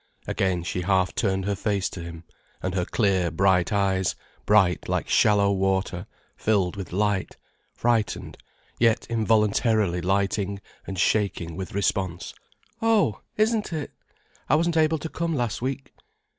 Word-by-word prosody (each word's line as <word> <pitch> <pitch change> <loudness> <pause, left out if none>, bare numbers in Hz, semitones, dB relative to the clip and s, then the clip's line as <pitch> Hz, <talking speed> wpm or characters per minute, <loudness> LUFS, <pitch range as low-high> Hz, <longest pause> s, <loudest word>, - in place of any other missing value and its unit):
Again 90 -3 0
she 90 +1 -3
half 95 0 +1
turned 95 -4 0
her 100 - 0
face 100 -1 -1
to 90 - -7
him, 85 -1 -8 0.4
and 95 - -1
her 90 -2 0
clear, 95 -5 +1
bright 90 +1 +2
eyes, 95 -3 +1 0.3
bright 95 -5 +3
like - - -1
shallow 100 -2 +4
water, 95 -1 -1 0.3
filled 100 -4 +1
with 95 -2 -7
light, 100 0 -1 0.4
frightened, 115 -2 0 0.4
yet 115 -1 +3
involuntarily 110 -4 +2
lighting 100 +1 0 0.3
and 95 - -5
shaking 90 -3 0
with 95 0 -6
response. 95 -3 -1 0.5
"Oh, 215 - +2 0.2
isn't 215 -2 +1
it! 155 -3 -4 0.6
I 140 - +5
wasn't 170 +2 +1
able 160 0 +3
to 160 - -5
come 165 0 -2
last 120 -5 -2
week." 135 +1 -4
100 Hz, 140 wpm, -25 LUFS, 95-115 Hz, 0.6 s, I